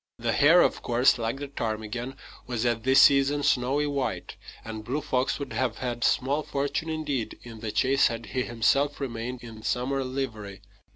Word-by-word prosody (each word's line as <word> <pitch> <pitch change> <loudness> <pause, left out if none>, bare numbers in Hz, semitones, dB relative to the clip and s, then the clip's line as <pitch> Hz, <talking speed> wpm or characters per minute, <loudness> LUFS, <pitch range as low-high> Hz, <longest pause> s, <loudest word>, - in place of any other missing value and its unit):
The 115 0 -1
hare, 165 +5 +6
of - - 0
course, 125 +1 +3
like 115 +3 -2
the 145 +1 -5
ptarmigan, 120 0 -4 0.3
was 120 -2 -2
at 120 -2 +1
this 130 +3 +6
season 140 +1 +4
snowy 140 +1 +2
white; 140 -3 -3 0.3
and 110 -1 -6
Blue 130 +7 -2
Fox 130 -3 0
would 140 - -6
have 125 -4 -1
had 120 -2 -3
small 140 +4 +2
fortune, 145 +2 -2
indeed, 150 -7 -3
in 115 -2 -10
the 110 -1 -4
chase 135 +5 +3
had 115 -1 -5
he 130 - -2
himself 135 +5 +1
remained 125 -1 -5
in 115 -2 -10
summer 135 +4 -1
livery. 110 -7 -5
125 Hz, 175 wpm, -27 LUFS, 115-140 Hz, 0.3 s, hare